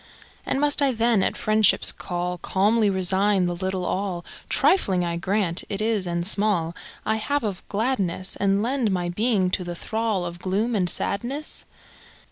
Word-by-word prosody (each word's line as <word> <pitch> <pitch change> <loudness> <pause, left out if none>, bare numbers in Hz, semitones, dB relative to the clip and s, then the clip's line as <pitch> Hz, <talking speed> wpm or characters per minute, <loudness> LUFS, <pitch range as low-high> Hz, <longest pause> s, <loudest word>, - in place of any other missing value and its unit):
And - - 0
must 290 +1 +3
I 275 -2 +3
then, 230 -2 +2
at - - 0
FriendshipŌĆÖs 215 -1 +3
call, 180 0 -3
Calmly 210 +3 +2
resign 190 +1 +2
the 175 - -1
little 185 0 -2
all 185 -3 -2 0.2
(Trifling, 190 - +3
I 170 0 -2
grant, 185 0 -1
it 200 - -3
is 215 -4 0
and 170 0 -2
small) 195 -5 +1 0.3
I 220 0 +1
have 285 +5 -1
of 200 -4 -3
gladness, 200 -5 -1
And 200 +1 +1
lend 250 -1 0
my 180 -2 -1
being 195 -1 +1
to 185 - +1
the 175 0 -5
thrall 220 -1 -2
Of 175 0 -6
gloom 205 +6 -1
and 185 -5 +1
sadness? 255 - -2
195 Hz, 165 wpm, -24 LUFS, 180-220 Hz, 0.3 s, must